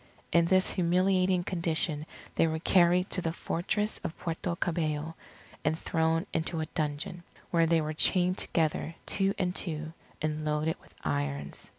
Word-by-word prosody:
In 170 0 +5
this 185 +2 +3
humiliating 185 +1 +2
condition 165 -3 -1 0.3
they 165 - +3
were 160 0 -1
carried 180 +2 +3
to 185 - 0
the 165 - -1
Fortress 210 +6 -1
of 165 - -4
Puerto 170 +1 -3
Cabello, 160 -3 -1 0.5
and 155 +2 +1
thrown 165 +1 +1
into 165 +1 0
a 160 - -1
dungeon; 155 +2 -2 0.3
where 165 -1 +4
they 165 0 +3
were 155 0 -2
chained 180 +4 +3
together, 160 0 +1
two 195 0 +1
and 180 -1 -1
two, 155 -2 -1 0.3
and 155 0 -2
loaded 155 +1 0
with - - -22
irons. 70 -1 -2
165 Hz, 155 wpm, -30 LUFS, 155-180 Hz, 0.5 s, In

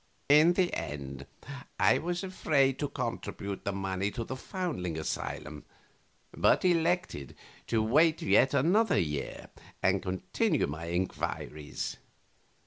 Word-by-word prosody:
A. 150 - +9
In 165 +3 +5
the 180 -1 +1
end 70 -1 -5 0.5
I 130 - +5
was 175 +2 -2
afraid 140 -8 +1
to 145 - 0
contribute 115 -7 -4
the 100 - 0
money 95 0 -2
to 115 +2 -4
the 130 - -5
foundling 130 - -3
asylum, 75 -1 -4 0.7
but - - +3
elected 170 - +1 0.3
to 110 -2 +1
wait 155 +8 +4
yet 140 -3 +4
another 180 - +3
year 75 -4 -3 0.3
and 95 0 +3
continue 95 -1 0
my 75 +3 -5
inquiries. 85 -3 -3
115 Hz, 125 wpm, -30 LUFS, -, 0.7 s, A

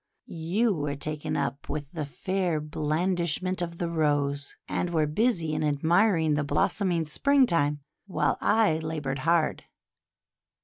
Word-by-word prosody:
You 185 +8 0
were 145 -4 -2
taken 150 +1 -3
up 140 - -3
with 145 -2 -4
the 155 -4 -4
fair 185 0 -1
blandishment 170 +4 -1
of 170 -1 -4
the 170 - -2
Rose, 145 -3 0
and 175 - -1
were 160 -3 +2
busy 170 -1 0
in 155 0 -1
admiring 160 +3 +3
the 145 0 +1
blossoming 175 +2 +1
Spring 275 - +3
time, 150 -7 0 0.3
while 190 - 0
I 210 -8 +3
laboured 150 -4 -3
hard. 165 +2 +1
160 Hz, 135 wpm, -27 LUFS, 150-180 Hz, 0.3 s, admiring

